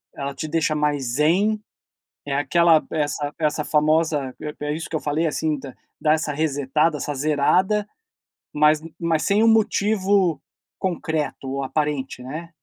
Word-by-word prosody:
ela 140 0 -4
te 145 - -4
deixa 160 -1 +1
mais 150 -2 0
zen? 195 +8 +2 0.6
É 140 -1 -2
aquela 160 +3 +4
essa 145 -1 -2
essa 150 -1 0
famosa 150 -3 +1
é 150 -1 -6
é 150 - 0
isso 160 - -5
que - - -4
eu 155 - 0
falei, 150 +3 -1
assim, 155 -1 -1
dá 135 -2 -9 0.3
dá 155 -1 +3
essa 155 -1 -1
resetada, 150 +1 +1
essa 145 +1 -4
zerada, 180 +9 +2 0.7
mas 150 +1 +4
u 165 - -11
mas 165 -2 +1
sem 205 +2 +3
um - - +5
motivo 200 -6 +2 0.4
concreto 160 -6 -2
ou 140 0 -2
aparente, 135 -2 -2
né? 155 +6 -7
155 Hz, 155 wpm, -23 LUFS, 145-165 Hz, 0.7 s, um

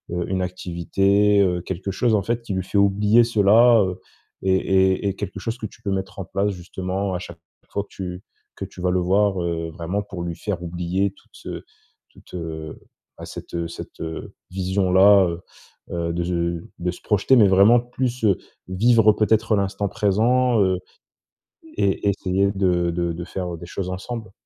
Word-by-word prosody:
heu, 90 -1 -2
une 95 -1 0
activité, 95 +3 +1
heu, 90 -2 +1
quelque 95 +2 -5
chose, 115 +4 +1
en 105 - +3
fait, 115 +4 -2
qui 110 - -4
lui 95 0 -1
fait 95 +2 -3
oublier 105 +3 +4
cela, 115 +1 +5
heu? 95 -1 -2 0.4
Et 95 0 +3
et 95 +1 +2
et 100 - -1
quelque 100 -1 -5
chose 115 +5 -4
que 115 - -6
tu 110 - -11
peux 100 -2 -3
mettre 95 0 -4
en 95 - -4
place, 100 +2 -1
justement, 95 +1 -4
à - - -2
chaque 85 -2 -10 0.3
fois 100 - -1
que - - -23
tu 90 -1 -6 0.3
que 95 - -5
tu 95 - -14
vas 90 0 +1
le 90 - +2
voir, 95 +1 +2
heu, 85 -1 -2
vraiment 85 +5 -3
pour 95 -3 -7
lui 85 -1 -4
faire 95 -2 -4
oublier 90 +3 -1
toute, - - -20
heu, - - -6 0.5
toute, - - -20
heu 80 -3 -6 0.4
à - - -8
cette, - - -9
heu 85 -1 -2
cette, 85 - -10
heu, 80 0 -6 0.2
vision-là, 95 +1 +4
heu 85 0 -4 0.5
heu 85 -1 -2
de 85 +1 -1
ze 85 -1 -1 0.2
de 90 +1 -1
se 90 - -12
projeter, 105 +5 +3
mais 105 -4 +7
vraiment 100 +5 +6
plus, 125 0 -3
heu, 100 -4 +4 0.3
vivre 110 +3 +4
peut-être 110 +1 +2
l'instant 100 0 -1
présent, 115 +5 +2
heu, 95 -2 +2 1.0
et 100 +1 +1
essayer 100 0 +1
de 90 -3 +1
de 85 0 -1
de 85 +1 -6
faire 90 -1 -5
des 85 +1 -10
choses 90 +1 -5
ensemble? 110 +2 -6
95 Hz, 190 wpm, -22 LUFS, 90-105 Hz, 1.0 s, mais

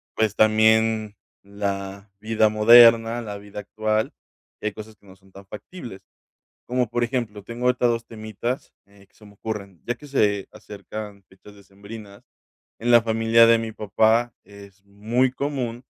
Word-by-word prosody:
pues 110 -2 0
también 110 0 +3 0.3
la 100 0 -5
vida 110 0 +1
moderna, 115 +1 +6
la 105 -3 -7
vida 100 0 -10
actual, 110 +1 -2 0.5
y - - -9
hay 105 - -3
cosas 110 +1 -11
que 100 - -28
no 95 - -15
son 95 0 -25
tan 100 +1 -14
factibles 105 - -10 0.6
como, 125 -1 -1
por 120 +1 -1
ejemplo, 115 -5 -3
tengo 120 +4 -6
ahorita 125 -1 +2
2 115 -1 -1
temitas, 110 +3 -6
eh, 100 -1 -22
que - - -41
se 105 - -18
me 105 - -16
ocurren, 100 -4 -7
ya 120 - -2
que 145 - -14
se 105 -8 0
acercan 105 0 -9
fechas 95 +2 -17
decembrinas, 100 +1 -13 0.6
en 120 +2 0
la 120 - +7
familia 115 0 +4
de 115 0 +5
mi 115 -1 -5
papá, 110 +3 +1
es 100 -1 -16
muy 115 +6 -1
común 130 -4 -4
110 Hz, 160 wpm, -23 LUFS, 100-115 Hz, 0.6 s, la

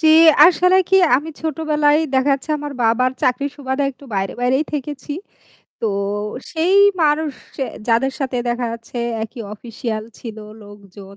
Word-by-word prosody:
জি, 320 - +4 0.4
আসলে 360 +2 +5
কি 385 - +4 0.2
আমি 295 +4 -4
ছোটবেলায় 305 -1 +1 0.2
দেখাচ্ছে, 275 +2 +1
আমার 290 0 -6
বাবার 230 +3 +3
চাকরির 275 +3 +1
সুবাদে 265 0 -2
একটু 275 +1 -17
বাইরে, 195 0 -1
বাইরেই 260 +5 +2
থেকেছি। 290 0 -5 0.7
তো - - 0 0.7
সেই 335 +4 +1 0.3
মানুষ 305 0 +2 0.3
যে, 270 - -1 0.3
যাদের 250 +4 +2
সাথে 260 -2 -2
দেখা 240 0 -1
যাচ্ছে 230 +1 -10 0.3
একই 225 +3 -7
official 220 0 -5 0.2
ছিল 225 -3 -8 0.3
লোকজন। 200 -1 -14
265 Hz, 140 wpm, -19 LUFS, 230-295 Hz, 0.7 s, আসলে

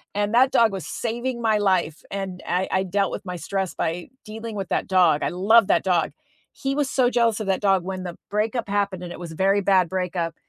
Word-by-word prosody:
and 205 +1 0
that 260 +2 +5
dog 230 -3 +4
was 190 -3 -5
saving 240 +1 -3
my 220 -2 +2
life, 185 -6 0
and 190 -2 -5
I 180 +2 0
I 190 - +2
dealt 195 +1 0
with - - -6
my 180 -1 -5
stress 190 +1 -3
by 170 +2 -3 0.2
dealing 220 +1 -7
with 195 -3 -4
that - - -1
dog, 175 -5 +3
I - - +1
love 200 +4 +4
that - - +2
dog, 175 -3 +1 0.4
he 270 0 -3
was 290 -2 0
so 255 -2 +3
jealous 235 -3 +2
of 215 - -4
that 190 - 0
dog 195 -3 +3
when 185 0 -5
the 175 -2 -7
breakup 215 +2 -1
happened 200 -3 -1
and 175 - -7
it - - -10
was 170 -2 -7
a - - -10
very 195 +3 +2
bad 190 -3 +3
breakup, 180 -3 -2
195 Hz, 235 wpm, -23 LUFS, 180-220 Hz, 0.4 s, that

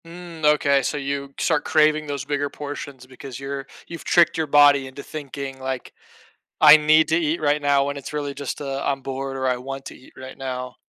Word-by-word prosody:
Mm, 170 -1 -11
okay, 145 -2 +4
so 145 - -2
you 140 0 -4
start - - +1
craving 155 0 +2
those 140 -1 -4
bigger 145 0 -1
portions 140 -3 -8
because 130 0 -10
you're 135 0 -5 0.2
you've 170 0 -8
tricked 170 -1 +4
your 160 -1 -1
body 145 -1 +5
into 130 +2 -10
thinking, 140 -2 -7
like, 130 -1 -5 0.7
"I 155 -1 +10
need 155 +1 +4
to 160 - +3
eat 165 0 0
right 150 0 +1
now," 140 -1 +3
when 140 0 -3
it's 140 - -8
really 145 -1 -3
just 140 -1 -5
a, 140 -1 -4
"I'm 135 -1 -1
bored," 135 0 -5
or 130 0 -1
"I 125 - +2
want 135 +2 -7
to - - -9
eat 130 - -19
right 130 0 -10
now." 125 -2 -5
140 Hz, 210 wpm, -22 LUFS, 135-150 Hz, 0.7 s, I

